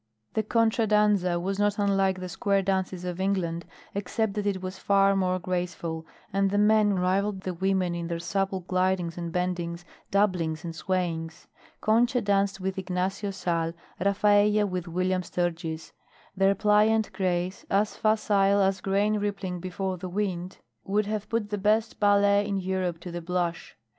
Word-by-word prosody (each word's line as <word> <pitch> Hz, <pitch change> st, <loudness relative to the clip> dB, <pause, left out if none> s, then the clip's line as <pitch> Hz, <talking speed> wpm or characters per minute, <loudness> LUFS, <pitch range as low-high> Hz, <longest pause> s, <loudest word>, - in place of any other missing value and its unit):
The 220 Hz, -, +1 dB
contra 225 Hz, +1 st, +2 dB
danza 205 Hz, -4 st, +3 dB
was 195 Hz, +3 st, -2 dB
not 205 Hz, 0 st, +2 dB
unlike 195 Hz, -2 st, +2 dB
the 185 Hz, -, -5 dB
square 195 Hz, +1 st, 0 dB
dances 190 Hz, -2 st, -1 dB
of 180 Hz, +1 st, -4 dB
England 175 Hz, -4 st, -1 dB, 0.3 s
except 205 Hz, +1 st, -1 dB
that 205 Hz, 0 st, -2 dB
it 195 Hz, -2 st, 0 dB
was 185 Hz, 0 st, -6 dB
far 195 Hz, 0 st, +3 dB
more 185 Hz, -1 st, +1 dB
graceful, 175 Hz, -2 st, -3 dB, 0.3 s
and 195 Hz, 0 st, +2 dB
the 205 Hz, -, 0 dB
men 210 Hz, -1 st, +4 dB
rivalled 190 Hz, +2 st, 0 dB
the 185 Hz, -1 st, -3 dB
women 190 Hz, 0 st, 0 dB
in 170 Hz, -1 st, -3 dB
their 170 Hz, 0 st, -2 dB
supple 190 Hz, +3 st, -1 dB
glidings 185 Hz, -1 st, 0 dB
and 170 Hz, -1 st, -5 dB
bendings, 175 Hz, -1 st, -2 dB, 0.2 s
doublings 180 Hz, -6 st, +1 dB
and 165 Hz, -1 st, -5 dB
swayings. 170 Hz, -1 st, -2 dB, 0.4 s
Concha 235 Hz, +3 st, +3 dB
danced 200 Hz, -1 st, +1 dB
with 190 Hz, 0 st, -3 dB
Ignacio 190 Hz, +2 st, -2 dB
Sal, 170 Hz, -4 st, -1 dB, 0.3 s
Rafaella 205 Hz, +2 st, +3 dB
with 180 Hz, -2 st, -4 dB
William 185 Hz, +2 st, 0 dB
Sturgis; 165 Hz, -2 st, -3 dB, 0.4 s
their 195 Hz, +1 st, +3 dB
pliant 210 Hz, +2 st, +3 dB
grace, 180 Hz, -1 st, -1 dB
as 205 Hz, +2 st, +1 dB
facile 205 Hz, -2 st, +2 dB
as 195 Hz, -1 st, +2 dB
grain 205 Hz, +2 st, +1 dB
rippling 200 Hz, -3 st, -3 dB
before 185 Hz, +1 st, -3 dB
the 185 Hz, +1 st, -5 dB
wind, 185 Hz, -2 st, -3 dB, 0.3 s
would 205 Hz, +2 st, 0 dB
have 210 Hz, 0 st, -3 dB
put 225 Hz, -2 st, -1 dB
the 205 Hz, -, -1 dB
best 215 Hz, +3 st, +1 dB
ballet 205 Hz, 0 st, +4 dB
in 200 Hz, -1 st, -1 dB
Europe 185 Hz, -2 st, -2 dB
to 175 Hz, -, -7 dB
the 175 Hz, 0 st, -5 dB
blush. 175 Hz, 0 st, -3 dB
190 Hz, 160 wpm, -27 LUFS, 180-205 Hz, 0.4 s, men